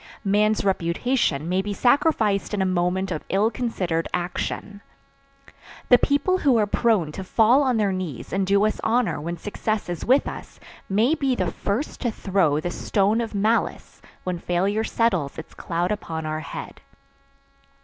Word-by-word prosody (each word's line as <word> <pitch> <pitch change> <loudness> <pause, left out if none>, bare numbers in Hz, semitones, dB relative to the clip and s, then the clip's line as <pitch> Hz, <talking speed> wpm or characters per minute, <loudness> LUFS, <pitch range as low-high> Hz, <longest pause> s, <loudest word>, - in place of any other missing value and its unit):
Man's 210 +1 +2
reputation 170 - 0
may 185 +2 +1
be 205 +1 -4
sacrificed 225 -7 +2
in 200 - -1
a - - 0
moment 185 +1 0
of 155 - -3
ill 205 +4 +2
considered 185 -9 -2
action. 180 +3 -4 1.1
The 245 - +7
people 290 +7 +2
who 270 -8 +3
are 215 - +3
prone 205 -7 +1
to 190 - -6
fall 225 +7 +4
on 255 -4 +1
their 205 -2 +1
knees 180 -10 -5
and 195 0 0
do 200 +1 +3
us 215 - -1
honor 230 -7 +1
when 170 +3 -4
success 210 +2 -3
is 175 -2 -4
with 265 +4 +3
us - - -8 0.3
may 220 +9 +3
be 275 -5 0
the - - -1
first 225 +10 -3
to 245 - 0
throw 190 -8 +1
the 175 +3 -3
stone 205 +5 +1
of 225 -2 -5
malice 215 +3 -1 0.2
when 180 -2 -3
failure 195 +6 0
settles 185 -13 0
its 160 - -9
cloud 175 +2 -2
upon 165 -6 -4
our 155 0 -2
head. 155 - -8
200 Hz, 165 wpm, -24 LUFS, 175-230 Hz, 1.1 s, The